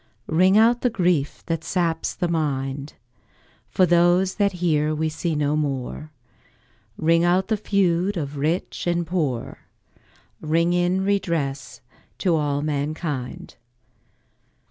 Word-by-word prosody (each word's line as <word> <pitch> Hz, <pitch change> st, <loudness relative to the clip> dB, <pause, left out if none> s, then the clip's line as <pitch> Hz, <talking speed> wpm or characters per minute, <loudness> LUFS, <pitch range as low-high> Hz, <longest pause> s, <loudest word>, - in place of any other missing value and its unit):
Ring 185 Hz, +5 st, +3 dB
out 235 Hz, +2 st, +4 dB
the 250 Hz, -, +2 dB
grief 175 Hz, -9 st, 0 dB
that 165 Hz, -1 st, -2 dB
saps 165 Hz, -3 st, -1 dB
the 175 Hz, -, -1 dB
mind, 140 Hz, -3 st, -2 dB, 0.7 s
For 185 Hz, -, +3 dB
those 175 Hz, +2 st, +3 dB
that 200 Hz, -1 st, +2 dB
here 155 Hz, -4 st, +1 dB
we 160 Hz, +1 st, -1 dB
see 160 Hz, +1 st, -2 dB
no 150 Hz, 0 st, +1 dB
more, 145 Hz, +1 st, -3 dB, 0.9 s
Ring 165 Hz, +1 st, +3 dB
out 185 Hz, +3 st, +2 dB
the 220 Hz, -, +2 dB
feud 195 Hz, -2 st, +1 dB
of 145 Hz, -2 st, -4 dB
rich 160 Hz, +5 st, -2 dB
and 175 Hz, 0 st, 0 dB
poor, 155 Hz, -9 st, -2 dB, 0.8 s
Ring 165 Hz, +3 st, +1 dB
in 175 Hz, +2 st, +1 dB
redress 165 Hz, -9 st, -2 dB, 0.4 s
to 180 Hz, -4 st, +1 dB
all 145 Hz, -2 st, 0 dB
mankind. 150 Hz, -2 st, -4 dB
165 Hz, 120 wpm, -23 LUFS, 150-180 Hz, 0.9 s, out